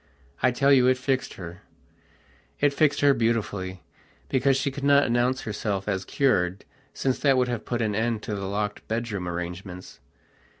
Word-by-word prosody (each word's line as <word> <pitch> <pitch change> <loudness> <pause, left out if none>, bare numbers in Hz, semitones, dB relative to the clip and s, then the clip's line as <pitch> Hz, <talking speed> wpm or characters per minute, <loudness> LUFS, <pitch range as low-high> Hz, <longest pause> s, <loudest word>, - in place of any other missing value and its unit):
I 130 - +4
tell 135 +3 +3
you 125 -2 +5
it 130 0 +4
fixed 130 0 -1
her. 85 -1 -9 1.0
It 145 -1 +3
fixed 145 0 +2
her 145 -1 +6
beautifully, 100 - -1 0.5
because 135 0 +2
she 140 0 -1
could 140 +1 -7
not 140 0 +5
announce 120 +2 +1
herself 105 -2 -3
as 95 -2 -1
cured, 95 -9 +1 0.3
since 130 -1 -1
that 135 -2 +3
would 125 -1 +2
have 120 -3 -3
put 120 -1 -1
an 105 -1 0
end 110 0 -1
to 110 - -4
the 100 -1 -3
locked 105 +1 -3
bedroom 110 -5 -3
arrangements. 90 +1 -6
115 Hz, 170 wpm, -26 LUFS, 100-130 Hz, 1.0 s, her